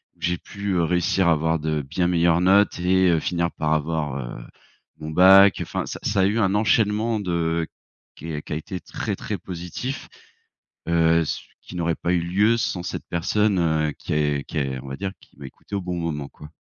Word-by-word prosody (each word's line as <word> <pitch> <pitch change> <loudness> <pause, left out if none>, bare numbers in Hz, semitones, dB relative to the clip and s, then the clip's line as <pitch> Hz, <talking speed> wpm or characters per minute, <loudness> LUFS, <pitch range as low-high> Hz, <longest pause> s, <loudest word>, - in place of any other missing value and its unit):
où - - -30
j'ai 90 0 0
pu, 100 +2 -7
heu, 85 - +2
réussir 90 +2 +1
à 85 - +5
avoir 80 +1 0
de 75 0 -1
bien 80 +6 -1
meilleures 85 -1 +3
notes 95 +2 +4
et 95 +1 +3
heu, 85 - +3
finir 85 +1 -1
par 80 0 -1
avoir, 75 -2 -1
heu, - - -7 0.5
mon 75 0 -6
bac. 95 +3 +7
Enfin, - - -3
ça - - -6
ça 100 -2 +1
a - - +4
eu 105 +3 0
un 100 -2 +2
enchaînement 110 +1 +2
de 85 -3 -1 0.5
qu 80 -1 -6
qui - - -6
a - - -1
été 90 +4 -6
très - - -4
très - - -4
positif, 90 - -6 0.8
heu, 85 0 +4
s 80 - -3 0.2
qui - - -11
n'aurait 85 -1 0
pas 85 - -2
eu 90 - +2
lieu 100 +7 +2
sans 90 -6 -2
cette - - -5
personne, 100 +4 +1
heu, 80 -3 +1
qui - - -4
est 75 -2 +1
qui - - -6
est 65 -2 -2
on 70 - -11
va 70 - -4
dire 95 -1 -3
qui - - -23
m'a 70 - -8
écouté 65 - -15
au 100 - -1
bon 90 -1 -4
moment 75 -4 -3
quoi. 75 - -13
85 Hz, 215 wpm, -23 LUFS, 80-95 Hz, 0.8 s, bac